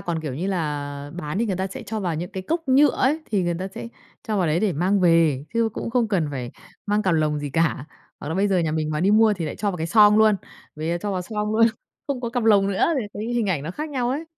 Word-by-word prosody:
còn, 170 -2 -3
kiểu 150 -5 -5
như 170 +8 -3
là, 145 -5 -3
bán 155 0 -4
thì 230 - +1
người 190 - -1
ta 190 +1 -1
sẽ 250 +7 -8
cho 220 0 -4
vào 175 -4 -1
những 175 +3 -4
cái 190 - -5
cốc 325 - -3
nhựa 275 +2 +6
ấy, 290 +6 +1
thì 200 -4 +1
người 175 0 0
ta 190 - -4
sẽ 195 - -8 0.3
cho 215 - -2
vào 180 - +2
đấy 160 +4 +1
để 210 -4 +1
mang 185 +6 +1
về, 165 -6 +3
chứ 230 -1 +2
cũng 230 - -5
không 235 -2 +1
cần 175 -7 0
phải 125 -3 -5 0.4
mang 210 +1 +1
cặp 185 -4 +2
lồng 155 -1 +1
gì 145 -1 -5
cả, 160 -3 0 0.4
hoặc 145 - -6
là 160 - -2
bây 195 +3 +2
giờ 190 -2 +2
nhà 160 -2 0
mình 155 -1 -1
mà 150 0 -1
đi 195 +3 +3
mua 220 0 +5
thì 180 -5 -3
lại 150 - -5
cho 205 - -1
vào 180 - -5
cái 160 - -3
xoong 210 +4 +6
luôn, 220 -1 +5 0.4
rồi 165 +3 -2
cho 205 +1 -2
vào 185 -1 -2
xoong 210 +2 -3
luôn, 230 0 +6 0.4
không 275 -3 -2
có 240 - -3
cặp 240 -2 -1
lồng 205 -3 +5
nữa 195 -1 +1
thì 230 - -3
cái 205 - -5
hình 235 -3 +1
ảnh 170 -8 0
nó 155 - -4
khác 305 - -5
nhau 250 -3 -1
ấy. 295 +5 -2
190 Hz, 290 wpm, -23 LUFS, 160-220 Hz, 0.4 s, nhựa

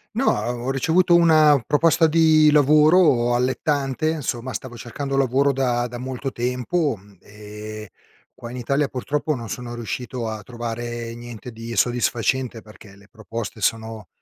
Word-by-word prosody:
No, 265 - 0
ho 120 +4 -2
ricevuto 170 +6 +2
una 155 -5 +5
proposta 160 +2 +3
di 155 -1 +5
lavoro 150 -4 +4
allettante, 135 +3 0
insomma, 130 -5 -3
stavo 125 -2 -6
cercando 135 +4 -5
lavoro 135 +1 +2
da 120 -2 0
da 120 0 -7
molto 130 +1 -5
tempo, 125 +4 -1
mhmm, 100 0 -20
ehm, 105 +1 -9 0.5
qua 120 -2 -10
in 125 - -7
Italia, 140 +4 0
purtroppo, 145 +4 -2
non 115 -2 -7
sono 120 -1 -6
riuscito 120 +1 -5
a 110 -1 -5
trovare 120 0 -5
niente 120 0 -9
di 115 +1 -7
soddisfacente, 120 0 0
perché 105 -2 -15
le 100 0 -19
proposte 110 -1 -7
sono 110 -2 -2
125 Hz, 145 wpm, -22 LUFS, 115-145 Hz, 0.5 s, una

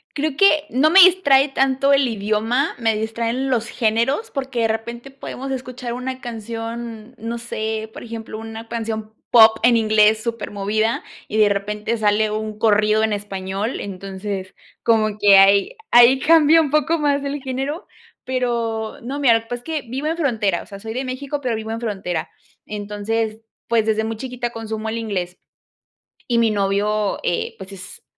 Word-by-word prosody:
Creo 295 -1 -1
que 310 -4 +4
no 280 +5 +3
me 380 +3 +7
distrae 295 -7 +5
tanto 270 +1 +2
el 275 -2 +3
idioma, 220 +6 0
me 225 -2 +1
distraen 230 +4 -2
los 235 -2 0
géneros, 235 - 0
porque 265 -4 -3
de 225 - +3
repente 235 +4 -5
podemos 270 0 -7
escuchar 255 -2 -5
una 255 +1 -5
canción, 230 0 -6
no 230 +1 -4
sé, 220 -1 -4
por - - -9
ejemplo, 225 -2 -7
una 225 0 -8
canción 220 -2 -4 0.2
pop 220 -2 +7
en 235 0 +5
inglés 215 0 +3
súper 230 -1 -4
movida 215 +3 -1 0.2
y 215 - -3
de 210 -1 +5
repente 210 +3 -2
sale 215 0 +2
un 215 0 -4
corrido 215 0 +3
en 220 -1 +1
español, 200 +2 -4
entonces, 195 0 -6 0.3
como 215 -2 +2
que 200 -2 +7
ahí 200 - +5 0.2
ahí 240 +2 +7
cambia 320 +2 +5
un 295 -4 -2
poco 305 +2 +2
más 285 -2 +1
el 280 0 -4
género 270 +7 -4 0.4
pero 235 -3 -2
no, 270 +5 -5
mira, 250 -5 +5
lo - - +2
que 225 - -19
pasa 245 - -3
es - - -29
que 315 -1 -3
vivo 270 +5 -3
en 325 +2 -1
frontera, 220 - 0
o - - -12
sea, 200 -2 -10
soy 220 0 -6
de 260 +3 -3
México, 275 +3 -4
pero 250 -4 -2
vivo 220 0 -5
en 225 - -3
frontera, 195 -6 -3 0.4
entonces, 215 +2 -3 0.3
pues, 230 -2 +2
desde 220 0 +1
muy 220 0 -4
chiquita 245 0 -4
consumo 220 -1 -5
el 225 - -3
inglés 185 -6 -3 0.9
y 235 -2 +2
mi 225 -2 +3
novio, 205 +1 0
eh, 175 - -2
pues, 190 0 -10
es 185 -2 -11
225 Hz, 175 wpm, -21 LUFS, 215-260 Hz, 0.9 s, me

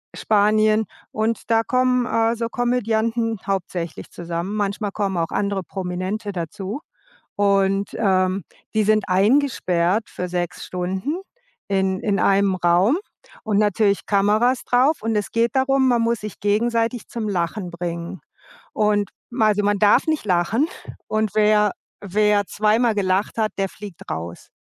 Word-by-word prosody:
Spanien. 215 +1 +3 0.3
Und 225 +2 -2
da 225 0 +5
kommen, 255 0 +2
äh, 230 0 +1
so 230 0 -3
Komödianten 230 -2 0
hauptsächlich 180 -3 -3
zusammen. 175 +3 -4
Manchmal 205 0 -2
kommen 195 -3 -2
auch 165 -1 0
andere 200 -2 -1
Prominente 190 +4 -4
dazu. 195 - -5 0.6
Und, 195 0 +2
ähm, 190 -2 +1 0.3
die 215 -1 +2
sind 215 -1 +3
eingesperrt 195 -3 +2
für 180 - -4
6 175 -1 -3
Stunden 190 - -3 0.5
in 190 -1 0
in 200 -2 0
einem 195 -1 +3
Raum 180 - +3 0.5
und 210 -2 +1
natürlich 205 -1 +2
Kameras 215 +5 +2
darauf. 260 +4 +3
Und 225 0 0
es 210 - -1
geht 235 +3 0
darum, 265 0 +3
man 240 -2 +3
muss 230 0 0
sich 210 -1 -8
gegenseitig 230 +3 0
zum 225 -3 -4
Lachen 180 0 -2
bringen. 170 0 -5 0.5
Und 210 -1 +1 0.2
ma 235 -3 +2
also 205 0 +2
man 205 0 +2
darf 205 +1 +4
nicht 310 -8 -1
lachen 195 - +1 0.4
und 215 -1 0
wer 210 -1 +4 0.3
wer 205 0 +2
zweimal 215 +2 +2
gelacht 195 +1 0
hat, 215 -1 +1
der 195 0 0
fliegt 200 -4 -10
raus. 85 +1 -6
210 Hz, 140 wpm, -22 LUFS, 190-225 Hz, 0.6 s, da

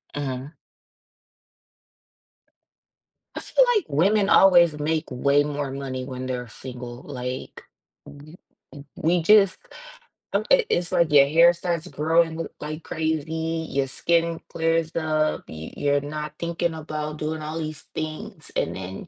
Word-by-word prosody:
Mhm. 135 0 -4 2.8
I - - -3
feel - - +3
like 410 -7 +1
women 195 +7 +2
always 175 -5 +6
make 155 +1 0
way 140 +3 +3
more 145 -2 -3
money 130 -2 -5
when 130 -1 -6
they're 125 -1 -4
single, 125 0 -9
like, 125 -1 -6 0.4
w 150 +4 -13 0.6
we 170 +2 +1
just 195 +1 +5 0.9
it - - +5
it's 175 0 0
like 170 -3 +2
your 140 -2 +7
hair 170 +3 +6
starts 170 -1 -3
growing 165 0 +1
l 165 - -3
like 155 +2 -6
crazy, 160 +1 -2
your 135 0 0
skin 165 +4 0
clears 165 0 0
up, 155 -1 0
you 80 0 -8
you're 145 0 +1
not 150 +1 -5
thinking 170 0 -1
about 155 -1 -5
doing 155 +1 -3
all 155 +2 -4
these 155 -2 -5
things, 155 0 -6
and - - -1
then 95 - -7
155 Hz, 130 wpm, -24 LUFS, 140-165 Hz, 2.8 s, your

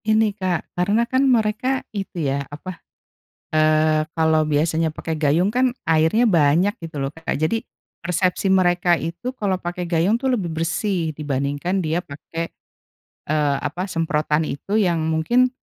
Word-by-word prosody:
Ini 220 -1 +3
Kak 185 -4 -3
karena 205 +6 +1
kan 260 +3 +2
mereka 245 +3 +1
itu 195 -5 -4
ya 140 +1 0
apa, 165 +4 -8 0.7
eee, 155 0 +3
kalau 160 -1 +3
biasanya 160 +2 +1
pakai 160 +1 -5
gayung 160 +6 +1
kan 255 +1 +3 0.2
airnya 160 +9 +3
banyak 170 0 +3
gitu 165 -2 -7
loh 135 +1 -2
Kak 165 +1 -3
jadi, 155 +10 0 0.4
persepsi 180 +2 0
mereka 175 -2 +3
itu 170 +11 -4
kalau 190 -3 -1
pakai 175 +1 -4
gayung 175 +6 +2
tuh 260 +1 0
lebih 195 -8 -1
bersih 165 +1 -1
dibandingkan 145 +4 -2
dia 160 +3 0
pakai, 165 +1 -6 0.8
eee, 150 -2 +1
apa 175 +7 -4
semprotan 155 -2 0
itu 195 +10 -2
yang 175 -6 +2
mungkin, 160 +11 +2
170 Hz, 145 wpm, -22 LUFS, 155-200 Hz, 0.8 s, Ini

